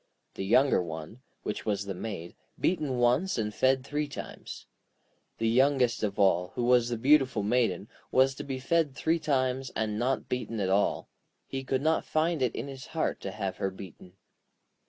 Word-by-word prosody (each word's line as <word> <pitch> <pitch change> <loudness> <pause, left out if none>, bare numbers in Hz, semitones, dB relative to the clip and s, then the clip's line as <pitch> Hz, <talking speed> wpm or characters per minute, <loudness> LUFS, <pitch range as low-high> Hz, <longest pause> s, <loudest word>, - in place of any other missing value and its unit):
The - - -5
younger 130 +3 +4
one, 80 +7 -7 0.2
which 105 - -3
was 100 -2 -1
the 100 - -3
Maid, 90 -3 -6 0.2
beaten 150 -8 0
once 125 +10 +2
and 105 -2 -1
fed 130 +2 +2
three 150 +1 -2
times. 145 - -8 0.7
The 115 - 0
youngest 130 +1 +3
of 105 -2 -2
all, 95 -3 +2
who 125 - -1
was 120 -1 +4
the 120 - -2
beautiful 130 -3 +3
Maiden, 105 -4 +1 0.2
was 130 +1 +4
to - - -7
be 135 -2 -4
fed 145 +1 +1
three 165 +1 +1
times, 130 -3 0
and 110 -1 -1
not 130 +3 0
beaten 125 -3 -3
at 95 -2 0
all; 100 +2 +1 0.4
he 135 0 -5
could 130 +1 -1
not 160 +1 +2
find 160 -1 0
it 125 -3 +1
in 120 - -4
his 135 -2 -8
heart - - 0
to - - -4
have 95 -2 -4
her 95 - -1
beaten. 95 -1 -11
125 Hz, 180 wpm, -29 LUFS, 105-135 Hz, 0.7 s, younger